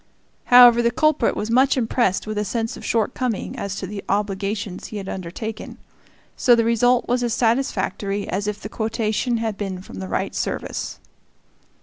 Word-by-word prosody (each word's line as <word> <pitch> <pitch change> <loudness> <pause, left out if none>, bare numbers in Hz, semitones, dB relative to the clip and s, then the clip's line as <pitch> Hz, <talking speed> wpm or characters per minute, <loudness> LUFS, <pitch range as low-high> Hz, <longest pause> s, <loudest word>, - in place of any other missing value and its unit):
However, 245 -1 +8
the 235 - +3
culprit 305 -2 +2
was 215 +2 -3
much 260 +3 +4
impressed 230 -5 +1
with 215 -1 -3
a - - 0
sense 225 +2 -2
of - - -11
shortcoming 230 0 -1
as 200 -1 -4
to 195 - -4
the 200 +1 -6
obligations 200 0 -2
he 215 - -7
had 195 -2 -6
undertaken; 190 +5 -6 0.6
so 245 - +5
the 230 -1 +2
result 245 +2 +3
was 245 +1 +1
as 240 -2 0
satisfactory 205 -4 0
as 200 +2 -2
if 210 0 -3
the - - -6
quotation 225 +2 -1
had 220 -3 -3
been 195 -3 -3
from 95 - -10
the 95 - -5
right 95 - -2
service. - - -3
220 Hz, 175 wpm, -22 LUFS, 200-240 Hz, 0.6 s, However